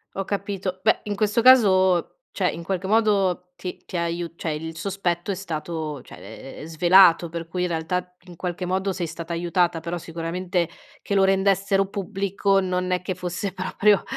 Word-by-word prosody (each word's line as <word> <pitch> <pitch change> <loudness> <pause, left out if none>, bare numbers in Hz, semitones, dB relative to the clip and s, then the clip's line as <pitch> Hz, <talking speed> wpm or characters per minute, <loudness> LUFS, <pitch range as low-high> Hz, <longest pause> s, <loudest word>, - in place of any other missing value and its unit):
Ho 195 - -2
capito. 195 -2 -3
Beh, 220 - +4
in 205 -1 -3
questo 210 +2 +1
caso 190 - +5 0.2
cioè - - +1
in 170 - -7
qualche 190 +1 -2
modo 195 -5 +2
ti 180 +1 -7
ti - - -9
ha 170 - 0
aiu 170 0 -3
cioè 160 - -3
il 160 +2 -5
sospetto 185 -1 -2
è - - -2
stato 160 -4 -5
cioè 110 +6 -11
è - - -7
svelato 175 +1 +5
per 170 0 -5
cui 180 +2 -2
in 180 - +1
realtà 180 +2 -3
in 175 - -11
qualche 180 0 -4
modo 190 +2 0
sei 175 -2 -3
stata 165 +1 -7
aiutata 175 0 +1
,però 170 +2 -4
sicuramente 170 +1 -2 0.3
che - - -4
lo 195 - +5
rendessero 195 0 +2
pubblico 195 0 0
non 185 0 -1
è 180 - +1
che 185 0 -3
fosse 180 +2 -4
proprio 195 +2 +2
180 Hz, 180 wpm, -24 LUFS, 170-195 Hz, 0.3 s, caso